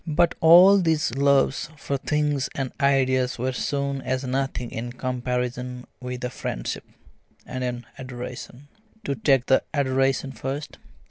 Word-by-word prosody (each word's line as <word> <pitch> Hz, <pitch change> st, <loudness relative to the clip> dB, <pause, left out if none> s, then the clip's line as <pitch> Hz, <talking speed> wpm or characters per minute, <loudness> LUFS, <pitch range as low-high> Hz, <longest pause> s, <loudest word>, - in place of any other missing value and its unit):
But 170 Hz, +2 st, +3 dB
all 180 Hz, +5 st, +8 dB
these 160 Hz, -8 st, +1 dB
loves 140 Hz, +1 st, +2 dB
for 140 Hz, -, -3 dB
things 145 Hz, 0 st, 0 dB
and 135 Hz, -4 st, -2 dB
ideas 130 Hz, -2 st, +2 dB
were 130 Hz, +2 st, -1 dB
soon 140 Hz, +1 st, -2 dB
as 130 Hz, +1 st, -2 dB
nothing 130 Hz, -2 st, -2 dB
in 120 Hz, +2 st, -5 dB
comparison 125 Hz, 0 st, -3 dB
with 125 Hz, 0 st, -6 dB
a 125 Hz, -, -2 dB
friendship, -, -, -4 dB, 0.6 s
and 130 Hz, 0 st, -5 dB
an 120 Hz, -1 st, -3 dB
adoration. 125 Hz, +1 st, -8 dB, 0.4 s
To 140 Hz, -, -1 dB
take 135 Hz, +1 st, +2 dB
the 130 Hz, -, +4 dB
adoration 135 Hz, -1 st, +1 dB
first. 135 Hz, +5 st, -5 dB
130 Hz, 135 wpm, -24 LUFS, 125-140 Hz, 0.6 s, all